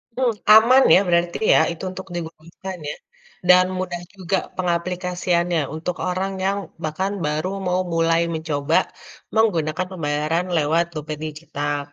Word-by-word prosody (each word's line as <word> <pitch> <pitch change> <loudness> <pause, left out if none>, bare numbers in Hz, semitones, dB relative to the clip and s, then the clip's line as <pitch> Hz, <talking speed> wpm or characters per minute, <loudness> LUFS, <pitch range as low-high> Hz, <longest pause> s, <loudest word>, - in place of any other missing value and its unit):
Mhm, 250 -3 +1 0.2
aman 245 +5 +7
ya - - +7
berarti 170 0 +1 0.2
ya? - - +6
Itu 170 - -8
untuk 190 +1 -8
digunakan 170 +3 -7
ya - - -4 0.5
dan 180 0 +7
mudah 175 -2 -4
juga 190 0 -1 0.2
pengaplikasiannya 175 -1 0
untuk 170 +3 -3
orang 190 +2 -2
yang 200 +1 +1 0.3
bahkan 185 +6 -2
baru 155 +5 -1 0.2
mau 180 +1 +1
mulai 165 -1 +2
mencoba 155 -1 0 0.6
menggunakan 180 -6 +1
pembayaran 160 0 -1
lewat 160 +3 +2
dompet 155 0 -5
digital. 145 -2 -4
170 Hz, 130 wpm, -22 LUFS, 155-185 Hz, 0.6 s, aman